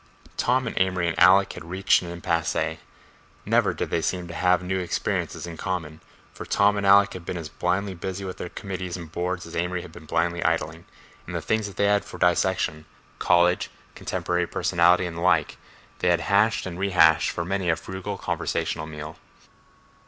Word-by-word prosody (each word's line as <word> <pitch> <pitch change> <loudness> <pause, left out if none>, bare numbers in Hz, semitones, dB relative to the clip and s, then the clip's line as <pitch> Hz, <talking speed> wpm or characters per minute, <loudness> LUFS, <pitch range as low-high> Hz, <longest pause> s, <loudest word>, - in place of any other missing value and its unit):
Tom 130 +1 +1
and 115 - -4
Amory 90 -2 +1
and 80 - -2
Alec 95 +1 +6
had - - -9
reached 95 +2 +3
an 90 - -7
impasse; 85 -1 -1 0.9
never - - +3
did - - -4
they 85 - +1
seem 90 +1 -2
to 85 - -8
have 90 +1 +2
new 95 +1 -1
experiences 90 -1 -2
in 85 -2 -8
common, 80 -3 -4 0.3
for - - -8
Tom 100 +1 +3
and 100 -1 -1
Alec 100 +1 +6
had 90 - -8
been 85 - -4
as 80 -2 -6
blindly 95 +2 -1
busy 95 +2 -5
with 95 - -6
their 90 - -6
committees 90 -2 -5
and 85 -3 -9
boards 90 +1 -3
as 85 - -9
Amory 90 +1 -2
had 90 - -11
been 80 - -13
blindly 85 +1 0
idling, 80 +1 -1 0.4
and - - -6
the - - 0
things 110 -2 -1
they 100 - 0
had 100 0 +3
for - - -10
dissection—college, 90 0 +1 0.2
contemporary 90 0 -2
personality 85 +1 +3
and 85 -1 -6
the - - -5
like—they 90 0 -1
had 85 -1 +3
hashed 100 +5 +2
and 90 -1 -6
rehashed 85 -5 +4
for 85 - -3
many 95 0 -1
a 80 - +3
frugal 95 +4 -6
conversational 80 -4 -2
meal. 75 0 -8
90 Hz, 180 wpm, -25 LUFS, 85-95 Hz, 0.9 s, Alec